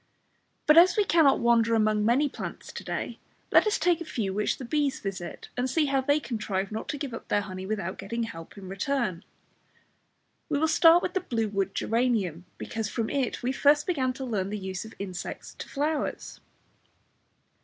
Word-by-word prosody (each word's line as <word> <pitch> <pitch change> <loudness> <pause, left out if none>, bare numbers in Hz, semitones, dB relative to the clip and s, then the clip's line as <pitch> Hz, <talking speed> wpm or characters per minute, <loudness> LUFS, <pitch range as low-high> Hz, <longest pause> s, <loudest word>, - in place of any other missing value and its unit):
But 305 +2 +8
as 355 +2 +5
we 415 - +4
cannot 320 -7 +5
wander 230 -1 +4
among 215 -1 +2
many 250 +7 +3
plants - - -7
to - - -7
day, - - -4 0.3
let - - +6
us 425 - +2
take 345 0 +2
a - - -1
few 210 - -3
which 210 +1 0
the 260 - -7
bees 285 +1 0
visit, 185 -3 -6
and 250 +1 -1
see 305 +4 +2
how 275 -1 +1
they 285 +3 +2
contrive 210 -7 -3
not 220 - -5
to 290 - -2
give 275 -4 -5
up 230 - -7
their 205 - +2
honey 190 -2 -7
without 195 -4 -3
getting 230 +4 -3
help 165 -5 -8
in 195 -2 -9
return. 195 -2 -2 1.3
We 295 - +1
will 320 +2 +2
start 330 +2 +6
with - - -2
the 375 - +1
blue 225 - -2
wood 195 -1 -2
geranium, 220 -8 0
because 220 -2 -4
from 225 -1 -2
it 265 -4 -1
we 250 - +1
first 290 +2 +4
began 270 -8 0
to 265 +1 -6
learn 200 -6 -1
the 210 - -3
use 190 0 -5
of 220 - -11
insects 185 -3 -6
to - - -7
flowers. 295 +2 -2
235 Hz, 195 wpm, -27 LUFS, 200-285 Hz, 1.3 s, But